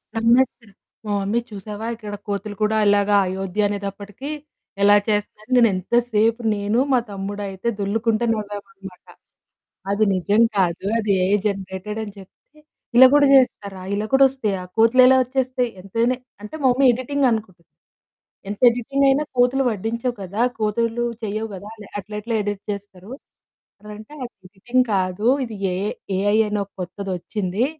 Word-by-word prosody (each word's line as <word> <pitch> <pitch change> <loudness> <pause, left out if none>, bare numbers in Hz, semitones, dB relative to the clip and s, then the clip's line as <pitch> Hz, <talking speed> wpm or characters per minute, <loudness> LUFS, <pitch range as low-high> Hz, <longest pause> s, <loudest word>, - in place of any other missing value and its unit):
నమ్మేస్తారు. 230 -2 +2 0.3
మా 210 - -3
మమ్మీ 205 +4 0
చూసావా? 210 +2 -7
ఇక్కడ 210 -2 -7
కోతులు 205 +1 -4
కూడా 220 +1 +2
ఇలాగా 205 0 +3
అయోధ్య 190 +2 -2
అనేటప్పటికి 200 +5 -6 0.5
ఎలా 205 +1 +6
చేస్తున్నాయి, 210 +1 -2
నేను 235 -2 +6
ఎంతసేపు 230 +3 +1
నేను, 205 +3 0
మా 255 - +4
తమ్ముడయితే 200 +1 -5
దొర్లుకుంట 220 +3 0
నవ్వామనమాట. 200 -3 -8 0.9
అది 215 +2 +2
నిజం 200 +4 +2 0.2
కాదు. 180 -1 0
అది 210 -2 0
ఏఐ 195 +2 +3
జనరేటెడ్ 195 +2 -5
అని 205 -2 -8
చెప్తే, 195 +10 -19 0.4
ఇలా 260 +1 +10
కూడా 285 -1 +5
చేస్తారా? 200 -7 +1
ఇలా 210 +1 -2
కూడా 270 0 +7
వస్తాయా? 215 -8 -3 0.2
కోతులెలా 255 +3 +6
ఒచ్చేస్తాయి? 255 -1 -1
ఎంతైనా 230 +6 0 0.3
అంటే, 210 - -8
మా 265 - +5
మమ్మి 270 +2 +2
ఎడిటింగ్ 265 +2 0
అనుకుటుంది. 190 -6 -5 0.8
ఎంత 205 - -5
ఎడిటింగ్ 260 +4 0
అయినా 280 +3 +2
కోతులు 250 +2 +3
ఒడ్డించవు 230 +4 -3
కదా! 200 +4 -3 0.2
కోతులు 230 +2 0 0.2
చెయ్యవు 215 +1 -3
కదా! 200 +3 -10
అలా 210 -2 -12
అట్లెట్ల 210 +3 -6
ఎడిట్ 205 -1 -4
చేస్తారు? 200 +1 -9 0.7
అనంటే 210 +5 -11 0.3
ఎడిటింగ్ 240 +7 0
కాదు 185 +3 0 0.2
ఇది 225 -2 -8 0.2
ఏఐ 195 +4 -2 0.3
ఏఐ 205 +2 +2
అని 210 0 -1
ఓ - - -11 0.2
కొత్తదొచ్చింది. 190 +3 -3
210 Hz, 135 wpm, -22 LUFS, 200-235 Hz, 0.9 s, ఇలా